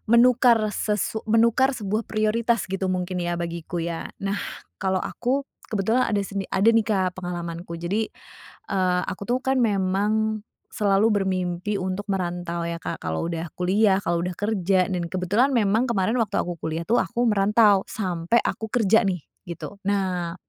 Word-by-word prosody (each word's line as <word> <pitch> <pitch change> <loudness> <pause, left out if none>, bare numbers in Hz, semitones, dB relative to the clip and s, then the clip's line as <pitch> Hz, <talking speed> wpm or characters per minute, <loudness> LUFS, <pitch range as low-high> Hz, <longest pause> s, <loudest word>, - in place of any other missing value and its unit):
menukar 240 0 +6
sesu 210 +2 -1
menukar 235 +4 +3
sebuah 215 -1 -2
prioritas, 220 +1 +1
gitu, 195 0 -1
mungkin, 185 0 -2
ya, 175 0 -1
bagiku, 170 0 -4
ya. 170 -1 -3 0.2
Nah, 200 +1 -1 0.4
kalau 190 -1 0
aku 265 +3 -1 0.2
kebetulan 220 +4 +1
ada 205 -2 0
seni 195 0 -4
ada, 200 +4 +5
nih, 225 -1 +3
Kak, 185 -4 0
pengalamanku. 170 -1 -5
Jadi, 185 +6 -1 0.6
eee, 185 -2 +1
aku, 195 - -6
tuh, 250 +2 0
kan, 265 0 +1
memang 210 0 +1 0.3
selalu 200 0 +3 0.2
bermimpi 185 +1 -1
untuk 190 +1 -2
merantau, 175 -2 -2
ya, 170 0 -4
Kak, - - -4
kalau 80 - -3
udah 165 0 -3
kuliah, 190 +2 +2
kalau 170 0 0
udah 180 - -3
kerja, 195 -2 +1
dan 175 -2 -1
kebetulan 200 +10 +1
memang 220 +2 +2
kemarin 225 +1 +1
waktu 225 -4 -1
aku 175 -1 -5
kuliah, 160 +2 -3
tuh, 230 +8 +2
aku 235 +7 +1
merantau 205 0 +4
sampai 185 +2 0
aku 220 - -2
kerja, 220 -1 +3
nih, 180 -5 -1 0.2
gitu. 170 +2 -7
Nah, 185 -4 0
195 Hz, 160 wpm, -24 LUFS, 180-220 Hz, 0.6 s, menukar